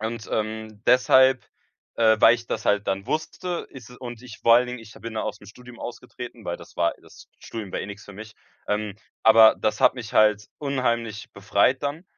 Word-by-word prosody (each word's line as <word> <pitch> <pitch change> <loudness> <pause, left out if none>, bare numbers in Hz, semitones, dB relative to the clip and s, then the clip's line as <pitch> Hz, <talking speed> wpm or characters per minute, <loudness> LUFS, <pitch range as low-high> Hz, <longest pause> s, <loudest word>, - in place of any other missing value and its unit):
Und, 110 0 -5
ähm, 110 -1 -4
deshalb, 130 +1 +5 0.5
äh, 110 -1 +4
weil 115 - +7
ich 120 0 -8
das 110 - -4
halt 105 0 +1
dann 95 0 -2
wusste, 175 +3 -3
ist 125 -4 -12
es 125 - -13
und 120 -2 -9
ich 120 -4 -11
vor 115 - +5
allen 125 +1 +4
Dingen 125 0 -6
ich 110 -1 -13
ha - - -15
bin 115 0 -7
da 110 - -2
aus 105 - -4
'm 100 - -15
Studium 125 +3 -14
ausgetreten, 120 -1 -9
weil 85 - -3
das - - -15
war 85 -1 +1
das - - -17
Studium 110 -4 -7
war - - -2
eh - - -5
nix 100 0 -10
für 100 - -12
mich, 110 +2 -11 0.3
ähm, 105 -1 -2 0.3
aber 110 0 +8
das 105 - -1
hat - - +5
mich 115 -4 -8
halt 105 -1 +3
unheimlich 120 -6 -2
befreit 100 +6 +1
dann. 145 +5 -3
115 Hz, 215 wpm, -24 LUFS, 105-125 Hz, 0.5 s, aber